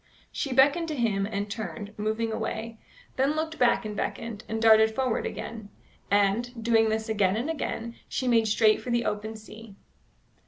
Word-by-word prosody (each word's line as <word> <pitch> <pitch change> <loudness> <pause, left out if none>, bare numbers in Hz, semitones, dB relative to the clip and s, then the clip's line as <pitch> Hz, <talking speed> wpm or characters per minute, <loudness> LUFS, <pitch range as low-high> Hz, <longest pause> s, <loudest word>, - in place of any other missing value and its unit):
She 275 - -3
beckoned 285 +6 +4
to 310 - -3
him 210 -6 0
and 205 -1 -3
turned, 205 -1 -6
moving 220 +2 -1
away; 220 +1 -4 0.4
then 275 +3 +2
looked 315 0 -3
back 240 -2 +3
and 210 -1 -4
beckoned, 225 0 -4
and 225 +1 -2
darted 220 0 +5
forward 260 -3 0
again; 220 -3 -7 0.4
and, 205 +4 +2
doing 225 -1 +3
this 220 0 -1
again 205 -3 +2
and 265 +8 -1
again, 235 -6 -4 0.2
she 255 - -2
made 230 -2 +3
straight 215 0 +3
for - - -7
the 240 0 +1
open 215 +1 -3
sea. 215 -1 -12
225 Hz, 170 wpm, -27 LUFS, 215-240 Hz, 0.4 s, darted